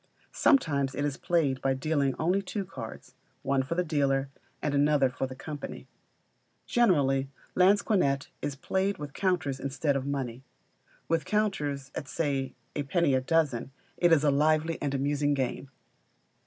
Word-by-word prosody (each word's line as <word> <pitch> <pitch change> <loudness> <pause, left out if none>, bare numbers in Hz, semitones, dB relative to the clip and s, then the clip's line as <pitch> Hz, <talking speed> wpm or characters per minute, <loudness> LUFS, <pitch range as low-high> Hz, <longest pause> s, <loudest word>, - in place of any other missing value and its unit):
Sometimes 140 - +2
it 145 - -1
is 145 -2 -1
played 145 -7 0
by 135 0 +1
dealing 140 -1 0
only 180 +5 +1
two 195 +1 -4
cards, 130 -11 -9 0.3
one 135 -1 +2
for 130 +6 -3
the 180 - +1
dealer, 140 -4 +1 0.3
and 150 - -1
another 140 -2 +3
for 130 +1 -2
the 130 - -8
company. 145 +2 -7 0.8
Generally 140 - +2 0.2
Lansquenet 185 - +3
is 145 - -3
played 190 +7 -1
with 145 -1 -7
counters 165 -8 0
instead 140 +2 -1
of 135 0 -2
money. 130 -3 -3 0.6
With 165 -1 +1
counters 145 -11 -1
at 140 - -5
(say) 135 -3 -2 0.2
a 145 - 0
penny 145 +1 +1
a 130 - +3
dozen, 135 -4 +1 0.3
it 175 -1 +3
is 155 -3 +5
a 145 - +4
lively 155 +3 +2
and 140 -1 -1
amusing 145 +1 +1
game. 130 0 -2
145 Hz, 155 wpm, -29 LUFS, 135-165 Hz, 0.8 s, is